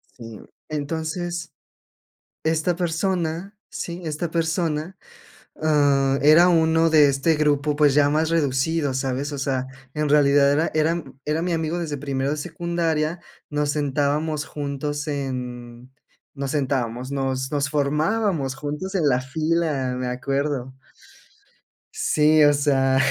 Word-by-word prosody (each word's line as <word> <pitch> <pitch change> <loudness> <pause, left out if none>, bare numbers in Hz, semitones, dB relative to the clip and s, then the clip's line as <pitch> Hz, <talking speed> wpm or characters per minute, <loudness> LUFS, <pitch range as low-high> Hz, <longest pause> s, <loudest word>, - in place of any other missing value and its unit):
Sí, 115 -3 -10
mm. - - -14 0.2
Entonces, 160 +3 -4 0.9
esta 160 +2 +1
persona, 175 +1 -2 0.2
sí, 170 +1 -5
esta 160 +1 -3
persona, 165 +1 -1 0.7
ah, 140 -3 +3
era 155 +5 +7
uno 165 -1 +3
de 150 -2 +6
este 140 +4 +1
grupo, 150 -1 +1
pues, 145 -2 +4
ya 145 0 +4
más 155 +2 +1
reducido, 145 -1 +1
¿sabes? 135 +2 -2
O 145 - -4
sea, 130 -1 -1 0.3
en 150 -1 -1
realidad 140 -1 +5
era 155 +3 +1
era 160 +1 +1 0.2
era 150 +1 -1
m - - -1
mi 180 - 0
amigo 160 +1 -1
desde 155 -4 -3
primero 135 0 -2
de 150 - -2
secundaria, 165 0 -2 0.3
nos 150 0 -1
sentábamos 145 +1 0
juntos 145 0 -4
en 125 -3 -5 0.4
nos 140 -1 -4
sentábamos, 130 -3 -2
nos 135 0 -2
nos 145 0 0
formábamos 150 +1 0
juntos 150 +8 -5
en 155 -6 +2
la 125 -1 +2
fila, 150 -1 -1
me 125 0 -3
acuerdo. 135 0 -2 1.2
Sí, 155 0 +3
o 145 0 +6
sea, 135 -2 +2
150 Hz, 130 wpm, -23 LUFS, 135-160 Hz, 1.2 s, era